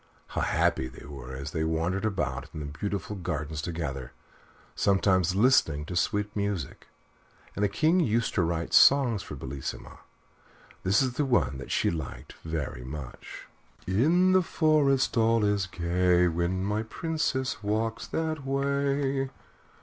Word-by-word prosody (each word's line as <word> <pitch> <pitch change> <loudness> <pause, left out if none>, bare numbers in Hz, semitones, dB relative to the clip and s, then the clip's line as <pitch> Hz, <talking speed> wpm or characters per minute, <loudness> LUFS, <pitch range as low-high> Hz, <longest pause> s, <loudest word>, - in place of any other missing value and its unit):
How - - -2
happy 65 - +1
they 65 - -12
were 65 -3 -8
as 70 +2 -6
they 80 -1 -1
wandered 80 +5 -1
about 70 -11 -2
in - - -4
the 75 - -5
beautiful 100 +7 -4
gardens 80 -4 -4
together, 70 -6 -4 0.6
sometimes 95 -2 +2
listening 95 - +3
to 90 - -6
sweet 105 +3 0
music! 100 -7 -3 0.7
And 100 - -1
the 100 - +3
King 160 - +2
used 115 -7 +1
to 95 - +2
write 85 0 -1
songs 130 -7 +6
for 75 - -8
Bellissima. 65 0 -7 0.8
This 100 +6 +3
is 125 0 -3
one 90 - +1
that 65 - -8
she - - +1
liked 80 -6 -6
very 75 -6 -4
much: 65 0 -8 0.4
In 160 - +3
the 185 0 +5
forest 150 -7 +2
all 115 -1 +3
is 100 -1 +1
gay 90 0 +2
When 85 +2 -1
my 105 +2 0
Princess 130 0 -2
walks 110 +2 -1
that 160 -2 -2
way. 140 0 0
95 Hz, 140 wpm, -28 LUFS, 80-130 Hz, 0.8 s, songs